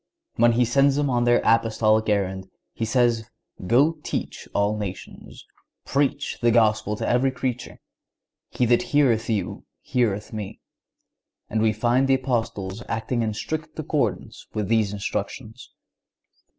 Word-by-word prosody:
When 120 +1 +4
He 120 +1 +3
sends 135 +3 +3
them 145 -1 0
on 120 -1 +1
their 120 0 +3
Apostolic 110 -1 +3
errand, 95 -2 -1 0.3
He 115 - -3
says: 120 -1 +1 0.4
"Go 145 - +3
teach - - -5
all 100 +1 +1
nations."(140) 100 -4 -8 0.5
"Preach 140 0 0
the 120 - +4
Gospel 110 -2 +2
to - - -4
every 125 +3 +2
creature."(141) 125 -2 -4 0.7
"He 125 - 0
that 120 0 +3
heareth 125 -6 +2
you 110 -3 -2 0.2
heareth 110 -5 -1
Me."(142) 105 -3 -6 0.9
And 110 - 0
we 110 0 +3
find 125 +4 +1
the 135 - +4
Apostles 115 -6 -2
acting 115 +2 -1
in 110 -2 -1
strict 155 +7 -5
accordance - - -2
with 105 -2 -2
these 110 -3 +2
instructions. 110 +3 -5
115 Hz, 135 wpm, -24 LUFS, 110-125 Hz, 0.9 s, When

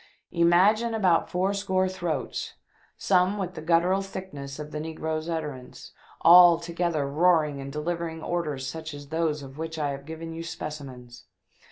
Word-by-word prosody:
Imagine 195 +7 +3
about 185 -6 +2
four 185 +3 0
score 190 -2 0
throats 170 -9 -4 0.2
— - - -35
some 185 +1 +2
with 185 -2 -3
the 165 - -7
guttural 175 +4 +2
thickness 185 -8 -7
of 150 0 -7
the 150 - -4
negro's 160 0 -4
utterance 150 -6 -6 0.2
— - - -26
all 175 0 +8
together 170 -3 -1
roaring 150 -2 +2
and 135 0 -7
delivering 160 +2 -4
orders 150 -6 -2
such 160 +2 -6
as 145 -1 -11
those 160 -2 -1
of 135 +2 -11
which 160 0 -5
I 145 -2 -1
have 140 +1 -8
given 165 +1 -7
you 165 - -6
specimens 130 -7 -8
165 Hz, 165 wpm, -26 LUFS, 150-180 Hz, 0.2 s, all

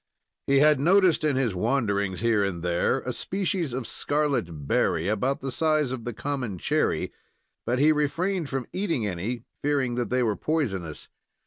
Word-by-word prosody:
He 140 - +4
had 150 -2 +5
noticed 180 +1 +4
in 150 -3 +2
his 130 -6 +1
wanderings 100 -3 0
here 115 -3 +3
and 90 -4 -3
there 85 -1 +1
a - - -4
species 185 -5 -2
of 125 0 -3
scarlet 125 - -1
berry, 85 +2 +1
about 125 +7 0
the 135 0 -3
size 155 -1 +1
of 125 -3 -5
the 120 - -2
common 125 -6 -3
cherry, - - 0 0.5
but 120 +1 +1
he 150 +4 +5
refrained 155 +3 0
from 135 -2 -2
eating 165 - -1
any, 105 +6 -3 0.2
fearing 140 -4 +1
that 120 0 -2
they 125 0 +2
were 110 -3 +1
poisonous. 95 - -2
130 Hz, 165 wpm, -26 LUFS, 105-150 Hz, 0.5 s, had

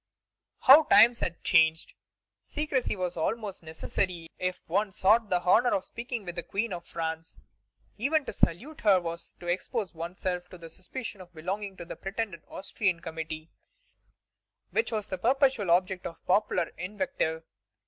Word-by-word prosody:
How 290 +4 +9
times 235 -5 +7
had 170 - -3
changed! 160 0 +3 0.5
Secrecy 295 -6 -1
was 180 -2 -2
almost 205 +4 -2
necessary 165 +1 -3
if 185 0 -2
one 200 +4 +1
sought 210 +4 +3
the 180 -2 +1
honor 225 +7 +5
of 190 - -1
speaking 235 -1 -6
with 175 - -4
the 175 - -4
Queen 200 +5 -2
of 175 -1 -6
France. 160 0 -4 0.6
Even 285 +5 +2
to - - -5
salute 245 - 0
her 200 -4 +5
was 170 -1 -6
to - - -10
expose 185 +4 -2
one's 170 +3 -6
self 180 -1 -3
to 180 - -11
the 165 -1 -11
suspicion 205 +2 -7
of 175 -1 -15
belonging 190 +4 -4
to 170 - -7
the - - -7
pretended 195 -4 -4
Austrian 190 -2 -1
committee 160 -1 -6 1.2
which 450 - 0
was 215 -2 -2
the 190 -3 -5
perpetual 260 -3 +2
object 185 +2 +2
of 165 - -12
popular 185 -3 +2
invective. 185 - -2
185 Hz, 160 wpm, -29 LUFS, 170-225 Hz, 1.2 s, How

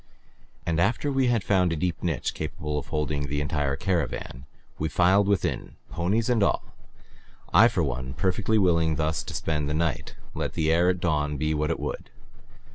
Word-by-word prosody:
And 85 0 0
after 120 +9 +1
we 135 -2 +2
had 120 -4 +2
found 90 -3 +2
a - - 0
deep 85 +2 -2
niche 80 -8 -1
capable 75 -1 -3
of - - -9
holding 75 -2 -2
the 75 +1 -2
entire 75 -1 -1
caravan 70 -5 -2 0.3
we 80 - -1
filed 95 +4 +4
within, 100 -1 -1 0.2
ponies 100 +7 0
and 120 -3 +2
all, 100 - +2 0.9
I - - +8
for - - 0
one 65 0 -3
perfectly 95 +8 +1
willing 85 -5 +3
thus 80 +1 0
to - - -7
spend 75 -2 -1
the 75 - -1
night, 80 -5 -1 0.2
let - - -3
the 80 -1 +1
air 85 +2 +4
at 90 -1 0
dawn 75 -3 0
be 75 +2 0
what 75 0 0
it - - -1
would. - - -5
80 Hz, 185 wpm, -26 LUFS, 75-95 Hz, 0.9 s, I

